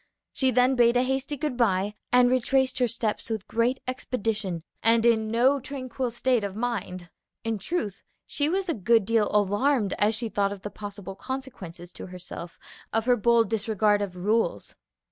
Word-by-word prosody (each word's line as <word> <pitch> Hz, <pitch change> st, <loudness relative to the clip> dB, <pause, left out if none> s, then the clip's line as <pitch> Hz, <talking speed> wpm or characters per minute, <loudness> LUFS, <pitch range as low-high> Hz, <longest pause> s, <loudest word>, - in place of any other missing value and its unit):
She 265 Hz, -, +2 dB
then 250 Hz, +1 st, +4 dB
bade 240 Hz, 0 st, +4 dB
a 245 Hz, -, +3 dB
hasty 265 Hz, +2 st, -2 dB
good 295 Hz, -2 st, -2 dB
by 205 Hz, -4 st, +1 dB, 0.2 s
and 245 Hz, 0 st, +6 dB
retraced 260 Hz, +1 st, +2 dB
her 250 Hz, -, +3 dB
steps 230 Hz, -1 st, -3 dB
with 220 Hz, -4 st, -3 dB
great 240 Hz, +3 st, 0 dB
expedition 220 Hz, -8 st, -2 dB, 0.2 s
and 230 Hz, +1 st, +4 dB
in 220 Hz, -2 st, +3 dB
no 255 Hz, +5 st, +3 dB
tranquil 260 Hz, -1 st, -4 dB
state 240 Hz, -1 st, +1 dB
of 200 Hz, -1 st, -4 dB
mind. 200 Hz, -7 st, -4 dB, 0.3 s
In 225 Hz, -2 st, -2 dB
truth, 210 Hz, -, -3 dB, 0.2 s
she 290 Hz, +1 st, -1 dB
was 380 Hz, +2 st, -1 dB
a 335 Hz, -, +1 dB
good 225 Hz, -1 st, +3 dB
deal 225 Hz, -1 st, +2 dB
alarmed 210 Hz, +2 st, +2 dB
as 210 Hz, +2 st, +3 dB
she 230 Hz, +1 st, -1 dB
thought 200 Hz, -2 st, 0 dB
of 200 Hz, -2 st, -8 dB
the 205 Hz, -, -5 dB
possible 200 Hz, -2 st, -7 dB
consequences 195 Hz, -8 st, -7 dB
to -, -, -8 dB
herself 180 Hz, -1 st, -9 dB, 0.3 s
of 225 Hz, 0 st, 0 dB
her 250 Hz, -1 st, +4 dB
bold 235 Hz, 0 st, +3 dB
disregard 215 Hz, -1 st, +2 dB
of 195 Hz, -3 st, -4 dB
rules. 210 Hz, +6 st, 0 dB
225 Hz, 175 wpm, -26 LUFS, 205-255 Hz, 0.3 s, and